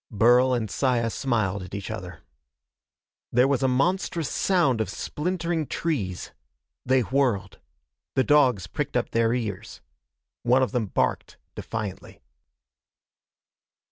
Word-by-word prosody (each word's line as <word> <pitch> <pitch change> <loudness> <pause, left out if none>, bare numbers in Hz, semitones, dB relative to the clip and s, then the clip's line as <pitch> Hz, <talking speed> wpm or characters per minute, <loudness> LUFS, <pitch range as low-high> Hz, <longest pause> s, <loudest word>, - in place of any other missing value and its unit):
Burl 120 +4 +4
and 115 -3 -1
Saya 115 +1 +1
smiled 105 -7 -1
at 95 +2 -8
each 100 +1 -5
other. 90 -7 -7 1.1
There 125 +2 +4
was 140 -3 +1
a 135 - +3
monstrous 165 +4 0
sound 145 -12 +2
of 110 - -2
splintering 170 -1 -2
trees. 105 - -3 0.5
They 130 0 +3
whirled. 120 -7 0 0.6
The 130 - +4
dogs 130 - +3
pricked - - -3
up - - -2
their 115 0 +2
ears. 110 -3 -5 0.6
One 125 +2 +3
of 130 - -1
them 120 -4 -1
barked - - -1 0.2
defiantly. 110 -4 -6
125 Hz, 120 wpm, -25 LUFS, 110-140 Hz, 1.1 s, Burl